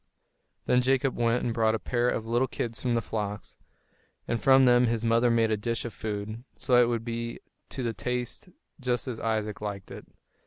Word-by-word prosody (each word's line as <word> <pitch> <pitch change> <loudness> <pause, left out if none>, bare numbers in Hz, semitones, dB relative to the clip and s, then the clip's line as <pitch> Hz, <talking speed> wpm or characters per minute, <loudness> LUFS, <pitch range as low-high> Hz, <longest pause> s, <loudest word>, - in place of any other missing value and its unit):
Then 125 - +3
Jacob 130 +1 +1
went 120 +1 +1
and 120 - 0
brought 110 -1 +2
a - - 0
pair 120 0 0
of 115 - -2
little 120 +3 +1
kids 115 -2 -3
from 120 -2 0
the 115 - 0
flocks, 105 -1 -5 0.7
and 115 - -1
from 135 -1 +6
them 120 0 +5
his 115 -1 -1
mother 115 +1 +3
made 115 -1 +3
a 110 - +2
dish 115 +3 -3
of 120 - -5
food, 110 +1 -5
so 130 - -1
that 120 - +7
it 120 - +4
would 115 -1 -2
be 115 0 -4 0.3
to 130 - -4
the 115 -1 -1
taste 125 - -4 0.3
just 125 -1 -1
as 120 -3 -4
Isaac 110 -2 -2
liked 100 -2 -5
it. - - -9
115 Hz, 205 wpm, -28 LUFS, 110-125 Hz, 0.7 s, that